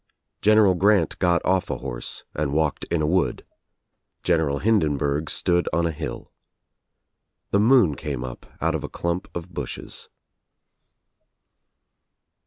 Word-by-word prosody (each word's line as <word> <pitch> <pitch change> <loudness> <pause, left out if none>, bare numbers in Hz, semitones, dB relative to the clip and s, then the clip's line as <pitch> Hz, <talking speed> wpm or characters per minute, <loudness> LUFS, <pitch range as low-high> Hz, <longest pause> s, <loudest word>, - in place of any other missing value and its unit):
General 105 -2 +5
Grant 95 -2 +2
got 85 -2 +2
off 95 0 +1
a - - -2
horse - - -6
and 75 -2 -2
walked 80 -1 0
in 85 -2 -1
a - - +2
wood. 90 +4 0 0.8
General 80 -5 +2
Hindenburg 75 -6 +1
stood 85 0 +1
on 85 0 +1
a 85 - 0
hilL 80 0 -6 1.2
The 100 - +3
moon 110 - +5
came 65 - -4
up 60 -1 -8
out - - +1
of - - -3
a - - -3
dump 85 +2 -3
of 85 +1 -6
bushes. 70 -5 -6
85 Hz, 130 wpm, -24 LUFS, 75-95 Hz, 1.2 s, General